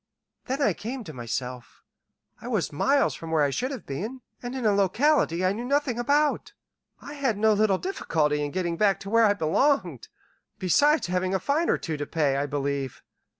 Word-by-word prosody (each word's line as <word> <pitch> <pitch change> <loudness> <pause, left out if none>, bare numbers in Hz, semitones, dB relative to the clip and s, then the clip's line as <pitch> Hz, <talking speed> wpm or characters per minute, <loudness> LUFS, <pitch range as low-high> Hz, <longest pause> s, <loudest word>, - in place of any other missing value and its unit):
Then 270 +3 -1
I 210 - +3
came 235 +7 -6
to 155 - -9
myself. 125 0 -6 0.6
I - - -8
was 210 - -1
miles 275 - +2
from 165 - -8
where 160 -2 +2
I 140 - +1
should 250 - -2
have 265 -6 -7
been, 215 - -5 0.2
and 245 +1 -5
in 255 -3 -3
a 210 - +4
locality 200 - +2
I 185 - +2
knew 230 +4 -5
nothing 270 -2 0
about. 290 +4 +1 0.5
I 290 - -9
had 270 -7 -1
no 220 +1 +4
little 205 -2 +2
difficulty 155 - -1
in 145 - -2
getting 175 +1 -2
back 200 0 +2
to 195 - -7
where 230 0 +5
I 205 - +2
belonged, 175 - +1 0.5
besides 290 - +3
having 185 +1 -1
a - - +1
fine 300 - 0
or - - +3
two 160 -2 -4
to 145 - -4
pay, 150 -4 +1
I 140 +1 -1
believe. 140 -2 -3
200 Hz, 195 wpm, -26 LUFS, 155-260 Hz, 0.6 s, where